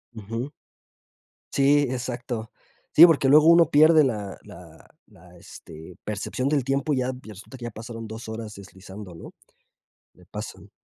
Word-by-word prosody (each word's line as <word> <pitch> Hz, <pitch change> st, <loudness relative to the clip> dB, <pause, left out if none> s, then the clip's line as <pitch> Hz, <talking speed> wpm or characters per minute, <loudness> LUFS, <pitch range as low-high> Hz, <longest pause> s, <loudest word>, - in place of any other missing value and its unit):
Ujú. 115 Hz, +6 st, -6 dB, 1.0 s
Sí, 145 Hz, +1 st, +4 dB
exacto, 120 Hz, -2 st, -5 dB, 0.4 s
sí, 165 Hz, -, +10 dB
porque 150 Hz, -5 st, +3 dB
luego 150 Hz, +2 st, +6 dB
uno 170 Hz, 0 st, +6 dB
pierde 155 Hz, +1 st, +6 dB
la 105 Hz, -7 st, -3 dB
la -, -, -15 dB, 0.2 s
la -, -, -19 dB
este, 80 Hz, +3 st, -13 dB
percepción 105 Hz, +5 st, -3 dB
del 145 Hz, -3 st, +1 dB
tiempo, 140 Hz, +3 st, -1 dB
y -, -, 0 dB
ya 130 Hz, 0 st, -1 dB
resulta 105 Hz, +5 st, -12 dB
que 120 Hz, -, -7 dB
ya -, -, -4 dB
pasaron 115 Hz, +1 st, -9 dB
2 110 Hz, +2 st, -9 dB
horas 110 Hz, -1 st, -7 dB
deslizando, 95 Hz, 0 st, -12 dB
¿no? 80 Hz, -, -12 dB, 0.8 s
Le -, -, -21 dB
pasan. -, -, -9 dB
120 Hz, 150 wpm, -24 LUFS, 105-140 Hz, 1.0 s, sí